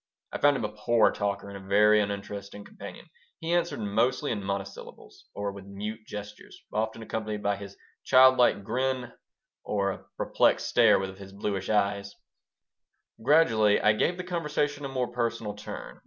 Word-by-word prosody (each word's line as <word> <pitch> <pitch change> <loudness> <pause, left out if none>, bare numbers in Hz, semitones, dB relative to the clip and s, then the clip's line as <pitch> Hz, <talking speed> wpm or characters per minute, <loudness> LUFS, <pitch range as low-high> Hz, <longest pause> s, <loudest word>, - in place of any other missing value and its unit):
I - - -4
found 145 -1 +4
him 110 - -2
a - - -2
poor 105 +1 +3
talker 100 -1 -2
and 100 - -8
a - - -7
very 105 +2 +5
uninteresting 100 0 -5
companion. - - -10 0.3
He 165 +1 -2
answered 175 -4 0
mostly 115 +7 0
in 105 -3 -3
monosyllables, 100 0 -7
or 100 0 -2
with 100 -1 -11
mute 105 +3 -7
gestures, 105 0 -9
often 110 +1 -2
accompanied 110 -2 -4
by 100 0 +1
his 100 0 -10 0.3
child 130 0 +7
like 110 -4 +4
grin 130 +3 -2 0.5
or 100 -2 0
by - - -14
a - - -24
perplexed - - +2
stare - - +5
of 95 0 -7
his 95 -1 -10
bluish 100 -1 -3
eyes 100 -1 0 1.1
Gradually 115 -7 +4
I 105 - +4
gave 175 +11 0
the 180 - -4
conversation 150 -5 -2
a - - -4
more 130 -2 -2
personal 115 -3 -2
turn. 105 +1 -9
105 Hz, 170 wpm, -28 LUFS, 100-125 Hz, 1.1 s, child